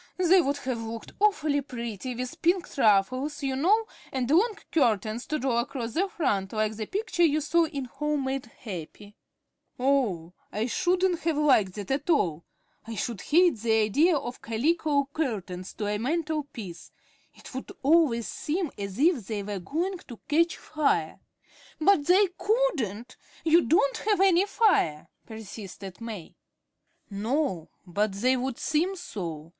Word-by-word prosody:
They 370 0 +5
would 285 -2 -1
have 255 -4 -3
looked 225 0 -7
awfully 310 -9 +2
pretty 240 -2 -5
with 250 +1 -6
pinked 350 +2 +1
ruffles, 255 +8 +2
you 270 -1 0
know, 405 +11 +3 0.3
and 255 -2 -1
long 420 +7 +4 0.2
curtains 225 - +1
to 305 - -1
draw 250 -3 +1
across 235 -1 -3
the 385 +5 +1
front 200 - -1
like 215 0 0
that 215 - -5
picture 405 -2 -2
you 310 -3 +4
saw 330 +3 +2
in 280 -4 -4
'Home 295 +3 -2
made 265 -1 -3
Happy.'" 205 -1 -9 0.6
"Oh, 235 -11 +1 0.2
I 215 +2 -1
shouldn't 360 +5 +1
have 325 -2 -1
liked 255 -11 +3
that 205 +1 -5
at 285 +4 -1
all. 170 - +2 0.4
I 225 - -5
should 220 -1 -3
hate 340 -3 +4
the 225 +1 +1
idea 275 - +3
of 245 -2 -6
calico 285 +4 +1
curtains 195 - -3
to 210 - -3
a 205 0 -1
mantel 310 +3 -1
piece. 195 -11 -9 0.4
It - - -13
would 260 - -6
always 280 -6 +3
seem 330 +1 -2
as 200 -1 -5
if 285 - +2
they 210 -2 -3
were 200 -1 -4
going 345 - -2
to 240 - -10
catch 335 +3 +2
fire." 310 -1 0 0.6
"But 315 -3 +3
they 380 +3 +6
couldn't. 260 - 0 0.3
You 330 +2 +6
don't 280 -2 +3
have 420 -2 +1
any 385 0 +4
fire," 370 - +2 0.2
persisted 200 -3 -9
May. 215 -7 -7 0.8
"No, 210 - -1 0.2
but 200 +3 0
they 250 +7 +2
would 255 -1 -2
seem 345 +6 0
so. 170 - -6
265 Hz, 155 wpm, -27 LUFS, 215-325 Hz, 0.8 s, they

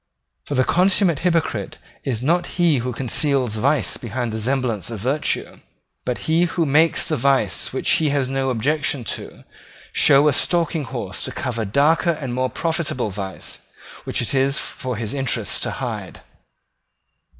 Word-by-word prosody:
For 145 - -3
the 130 - +4
consummate 180 -1 +4
hypocrite 170 -3 -1 0.3
is 125 -3 -2
not 170 +5 +2
he 170 -5 +4
who 125 +2 -2
conceals 130 -1 +1
vice 140 +7 +1
behind 120 0 -4
the 110 0 -4
semblance 120 -6 -1
of 115 -3 -5
virtue, 135 +8 -2 0.5
but 125 - -1
he 165 +2 +3
who 170 -1 0
makes 155 +3 +3
the 155 - 0
vice 130 -7 +1
which 130 - -4
he 155 -2 +3
has 140 -2 +1
no 135 0 -1
objection 140 +3 0
to - - -6 0.5
show 140 +2 +5
a 150 - +4
stalking 165 0 0
horse 115 -8 -5
to - - -4
cover 115 -4 -3
darker 155 - +2
and 130 -5 -4
more 130 +1 0
profitable 160 - -1
vice 95 -1 -6 0.5
which - - -1
it 120 - -3
is 135 +1 +2
for 130 -2 -4
his 110 -1 -4
interest 135 -2 -1
to - - -1
hide. - - -5
135 Hz, 160 wpm, -21 LUFS, 120-155 Hz, 0.5 s, show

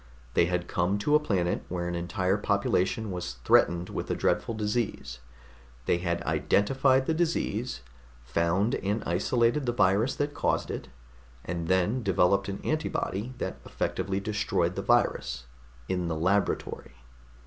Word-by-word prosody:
They - - +4
had 90 0 -1
come 90 +3 0
to 105 +9 0
a 150 - +7
planet 95 -11 0
where 85 -1 -2
an 85 - -2
entire 95 +3 0
population 100 +1 0
was 90 -6 -4
threatened 85 +1 +4
with - - -4
a - - 0
dreadful 115 - 0
disease. 105 - -2 0.7
They 85 - +2
had 85 -1 -2
identified 130 +5 +2
the 160 - +1
disease, 160 - -1 0.4
found 85 - +1
and 105 0 -1
isolated 120 - +1
the - - +3
virus 105 +5 +3
that 145 0 -1
caused - - 0
it, - - -5 0.6
and 85 -1 -3
then 95 +7 +2
developed 100 -1 +2
an 100 - -5
antibody 130 -6 -2
that - - -4
effectively 95 0 -2
destroyed 100 -4 0
the - - -2
virus - - +1 0.4
in 90 -2 -1
the 80 - -1
laboratory. 95 -6 0
95 Hz, 145 wpm, -28 LUFS, 85-110 Hz, 0.7 s, a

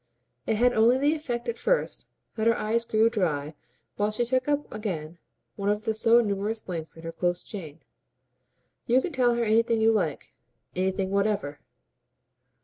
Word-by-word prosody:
It 220 - +2
had 245 +3 +3
only 230 +3 +4
the 290 +3 +2
effect 260 -7 -4
at 470 - -3
first - - 0 0.3
that 220 0 0
her 230 - +4
eyes 230 +2 0
grew 220 0 +3
dry 160 -10 -1 0.4
while 205 0 +1
she 215 +3 -1
took 255 +2 0
up 295 0 +1
again 170 -6 -5 0.4
one 200 0 -1
of 210 +1 0
the 220 - +1
so 225 +2 +5
numerous 210 +1 -2
links 165 -3 -6
in 165 - -12
her 165 - -5
close 175 +1 -1
chain. 165 -6 -8 1.1
"You 245 +2 +5
can 345 - -3
tell 250 -4 +2
her 235 - 0
anything 230 +1 +2
you 220 +1 +4
like, 180 -9 -2 0.4
anything 190 +1 -1
whatever." 200 -7 0
215 Hz, 170 wpm, -27 LUFS, 190-235 Hz, 1.1 s, so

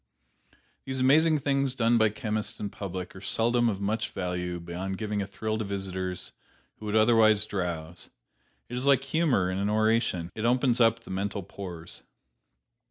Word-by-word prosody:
These 130 -1 -4
amazing 155 +4 +4
things 135 -1 +1
done 115 -1 +3
by 110 -1 +5
chemists 110 -2 -3
in 100 -1 -4
public 95 -2 -6
are 95 - -10
seldom 120 +3 +2
of 100 -3 -3
much 110 +3 -1
value 90 -1 -3
beyond 90 +3 -5
giving 105 -1 -2
a 100 - -3
thrill 110 +2 -3
to - - -1
visitors 95 -2 -3 0.5
who 110 - -7
would 105 - -1
otherwise 110 -1 +5
drowse; 85 -4 -4 0.6
it 120 - -6
is 125 +3 -2
like 135 -1 +5
humor 135 - +1
in 95 - -2
an 100 +1 0
oration: 110 -5 +1
it 110 - -5
opens 125 0 +3
up 115 0 +4
the - - -11
mental 100 +1 -2
pores. 90 -2 -7
105 Hz, 165 wpm, -28 LUFS, 95-120 Hz, 0.6 s, by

